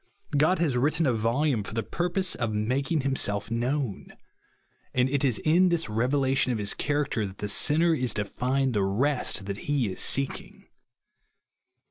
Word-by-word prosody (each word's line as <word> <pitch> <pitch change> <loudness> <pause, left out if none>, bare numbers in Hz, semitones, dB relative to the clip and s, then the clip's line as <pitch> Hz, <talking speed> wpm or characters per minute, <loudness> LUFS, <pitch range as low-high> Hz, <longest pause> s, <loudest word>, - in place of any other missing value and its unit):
God 155 +6 +3
has 150 -7 0
written 155 +6 +2
a 130 - +2
voJame 115 +2 0
for 105 - -8
the 115 - -1
purpose 180 +1 -1
of 115 -3 -2
mak 125 +7 -1
ing 160 -3 +2
himself 110 -6 -1
known; 125 -1 -2 0.8
and 125 0 +3
it 140 +1 -1
is 125 -5 +2
in 175 +4 +4
tliis 165 -11 -1
reve 120 +3 +1
lation 135 -2 +2
of 120 - -1
his 105 -1 0
character 145 -7 -1
that 95 0 -11
the 105 - -4
sinner 160 +10 +3
is 125 -7 -1
to 105 -1 -1
find 130 +4 -1
the 105 - +1
rest 110 0 0
that 100 0 -4
he 130 -8 +1
is - - -5
seeking. 135 0 -1
130 Hz, 175 wpm, -27 LUFS, 110-145 Hz, 0.8 s, in